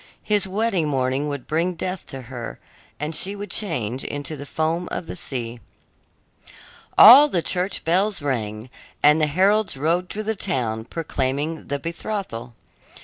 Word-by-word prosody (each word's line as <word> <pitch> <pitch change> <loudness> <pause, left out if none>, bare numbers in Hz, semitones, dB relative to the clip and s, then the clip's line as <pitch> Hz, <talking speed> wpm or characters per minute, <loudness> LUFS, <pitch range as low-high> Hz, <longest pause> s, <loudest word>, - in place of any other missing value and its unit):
His 205 -2 +2
wedding 195 -4 0
morning 135 0 0
would 140 -3 -5
bring 170 +3 0
death 180 +2 -5
to 135 -1 -8
her, 120 -1 -7 0.4
and 150 +1 -3
she 195 +5 0
would 205 +1 -7
change 130 - 0
into 145 +2 -4
the 140 0 -9
foam 165 +4 -1
of - - -4
the - - -7
sea. 120 -3 -5 1.4
All 275 +6 +10
the 175 - 0
church 185 +2 -1
bells 195 +5 +2
rang, 115 -5 -3 0.3
and 150 +2 +6
the 155 - +4
heralds 195 +3 +2
rode 170 +6 0
through 215 - -4
the 220 +1 -2
town 115 - -2
proclaiming 150 +1 -2
the 140 - -1
betrothal. 165 - -5
160 Hz, 150 wpm, -23 LUFS, 130-190 Hz, 1.4 s, All